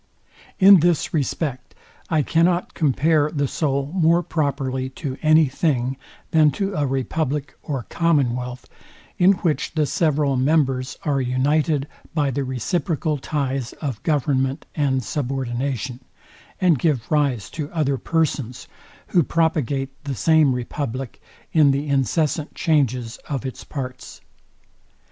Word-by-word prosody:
In 195 -1 +8
this 170 -1 +1
respect, 140 -3 -2 0.3
I 155 -3 +2
cannot 170 +4 +1
compare 150 +1 +2
the 145 -2 -1
soul 140 -1 -1
more 170 -1 +3
properly 135 -5 -1
to 135 -4 -4
any 155 0 +5
thing 130 -2 0 0.4
than 155 -2 +5
to 195 0 -2
a 150 -5 0
republic 140 +2 -2
or 135 -6 -4
commonwealth, 125 -7 0 0.5
in 185 +2 +6
which 155 -3 0
the 155 -2 +2
several 150 -3 +1
members 130 -2 +1
are 140 -4 +1
united 140 +3 +1 0.3
by 145 -3 +1
the 140 +2 -1
reciprocal 150 +4 -1
ties 135 -3 -2
of 135 -8 -5
government 140 -3 0
and 135 -4 0
subordination, 130 -1 -3 0.6
and 175 - +3
give 135 -8 0
rise 140 -9 +1
to 150 -1 -5
other 140 -5 0
persons, 145 -7 -1 0.4
who 175 - +4
propagate 145 -4 0
the 140 -2 -3
same 155 -2 +4
republic 125 0 -5 0.3
in 155 -3 +5
the 140 +2 0
incessant 145 +2 0
changes 130 -8 0
of 135 -3 -3
its 130 - -6
parts. 130 -3 -7
145 Hz, 125 wpm, -22 LUFS, 130-155 Hz, 0.6 s, In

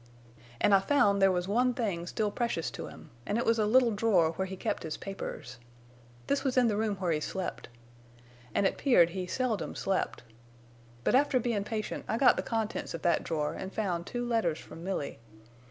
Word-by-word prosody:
"An' 205 - +4
I 195 - +7
found 200 -3 +3
there 195 0 +6
was 180 0 -1
one 245 +4 +2
thing 185 -8 -2
still 210 +2 -1
precious 230 -9 -2
to - - -6
him, - - -13 0.2
an' 205 - 0
it 235 - 0
was 230 0 +3
a 210 - +2
little 245 +1 +5
drawer 205 -7 +3
where 190 +3 -3
he 190 0 -7
kept - - -2
his 160 - -4
papers. 160 -10 -7 0.7
This 280 -1 0
was 265 -2 0
in 250 - +6
the 215 - +1
room 215 -1 0
where 180 -3 -1
he 155 - +1
slept. 185 +4 -4 0.9
An' 200 - +3
it - - 0
'peared 175 - +5
he 185 0 -4
seldom 245 -1 -2
slept. 195 -9 -1 0.8
But - - +2
after 270 0 +4
bein' 225 -4 -1
patient 215 -1 -4
I 225 - 0
got 260 - +6
the - - -1
contents 220 -6 -3
of 165 - -8
that 175 - +2
drawer 150 -2 -1
an' 190 - -5
found 185 -5 -2
two 245 0 -3
letters 225 -10 +1
from 165 - -11
Milly. 185 -6 -3
205 Hz, 205 wpm, -30 LUFS, 180-235 Hz, 0.9 s, I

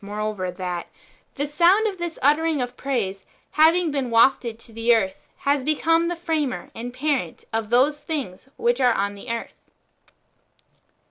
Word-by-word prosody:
G3 - - -10
moreover, 210 -2 -3
that 180 -1 -4 0.2
" - - -35
the 285 - -1
sound 350 +8 +4
of 395 -4 -2
this 345 -1 -4
uttering 305 +2 +3
of 245 0 -3
praise, 205 -9 -2 0.3
having 325 +2 +4
"been 275 -3 -2
wafted 230 0 +3
to 230 0 -15
the 230 +1 +3
earth, 190 -9 -2
has 280 -1 +1
become 330 +3 +2
the 350 - -1
Framer 315 -6 -2
and 240 +2 -6
the 250 - -18
Parent 290 -1 -2
of 225 -1 -1
those 270 +5 +3
thincrs 285 - -5
which 240 +2 +1
are 250 -2 +5
on 200 -1 -1
the 205 +5 -10
earth." 230 0 -6
255 Hz, 175 wpm, -23 LUFS, 225-305 Hz, 0.3 s, are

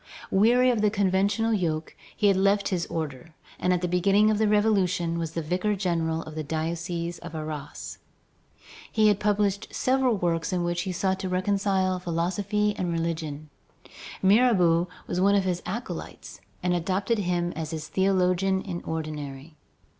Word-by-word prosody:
Weary 245 +6 +4
of 230 -3 0
the 210 - +4
conventual 200 +2 +1
yoke, 165 -6 -2 0.2
he 215 - 0
had 200 -1 +5
left 200 +1 +2
his 175 -3 -1
order, 155 -1 -5 0.2
and 180 - +1
at 180 -1 +1
the 180 - 0
beginning 195 +4 +3
of 210 - 0
the 220 - +3
Revolution 195 -5 +2
was 165 -1 -4
the 165 - -3
vicar 185 +6 0
general 165 -4 -1
of 155 - -10
the 155 - -4
diocese 170 +2 -3
of 170 -1 -9
Arras. 155 -2 -6 0.9
He 215 -1 +4
had 205 -1 +2
published 205 -1 +1
several 255 -3 +2
works 170 -2 -1
in 180 -1 0
which 175 0 -1
he - - -1
sought 190 +1 0
to 190 - -3
reconcile 190 0 +1
philosophy 190 +5 0
and 175 -2 -1
religion. 160 -3 -3 0.7
Mirabeau 190 -5 +4 0.2
was 180 - -2
one 200 +1 +4
of 200 - +3
his 180 -2 -1
acolytes 235 +7 -6 0.2
and 180 0 +2
adopted 190 +6 0
him 175 -2 0
as 160 -1 -4
his 155 -2 -5
theologian 190 +1 +1
in 175 -3 -5
ordinary. 150 -2 -5
180 Hz, 160 wpm, -26 LUFS, 165-200 Hz, 0.9 s, had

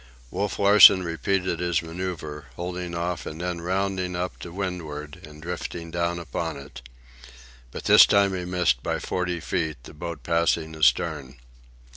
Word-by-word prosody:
Wolf 100 +1 -2
Larsen 100 -2 +8
repeated 90 +1 -1
his 85 -1 0
manœuvre, 80 -3 -6
holding 90 0 -5
off 85 0 -3
and 80 - -7
then 90 -1 -3
rounding 95 0 -1
up 90 +1 -4
to 85 - -8
windward 80 -6 -5
and 75 0 -13
drifting 85 -1 -5
down 85 0 -1
upon 85 -1 -4
it. 65 -3 -11 0.9
But - - -8
this - - +8
time 100 -1 +3
he 90 - -4
missed 90 -9 +1
by - - -2
forty 90 -1 -2
feet, 80 -2 -2
the - - -12
boat 85 0 -7
passing 85 -1 0
astern. 75 -3 +1
85 Hz, 150 wpm, -25 LUFS, 80-90 Hz, 0.9 s, Larsen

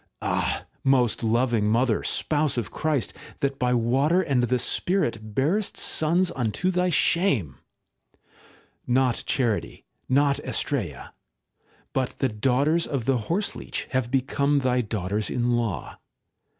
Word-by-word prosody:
Ah! - - -1 0.2
most 125 -4 +2
loving 115 -1 +2
Mother, 115 0 +2
Spouse 150 -3 0
of 115 - -3
Christ, 150 -6 -1 0.3
that 140 -1 -1
by 125 -1 +1
water 135 +10 +2
and 140 -7 +1
the 125 +1 +1
spirit 115 - -1
bearest 180 +10 0
sons 175 +3 +1
unto 125 - 0
thy 180 0 +1
shame! 160 - +1 1.3
Not 125 -1 +2
charity, 120 -6 -1 0.2
not 140 +1 +3
Astraea, 105 - -3 0.8
but 130 -2 -2
the 135 - +1
daughters 135 +9 +1
of 135 -5 -3
the 130 -1 +2
horseleech 200 +5 -2
have 130 -2 0
become 140 +2 +1
thy 125 -1 +2
daughters 105 -1 -2
in 120 0 0
law. 115 -6 -3
130 Hz, 125 wpm, -25 LUFS, 115-145 Hz, 1.3 s, not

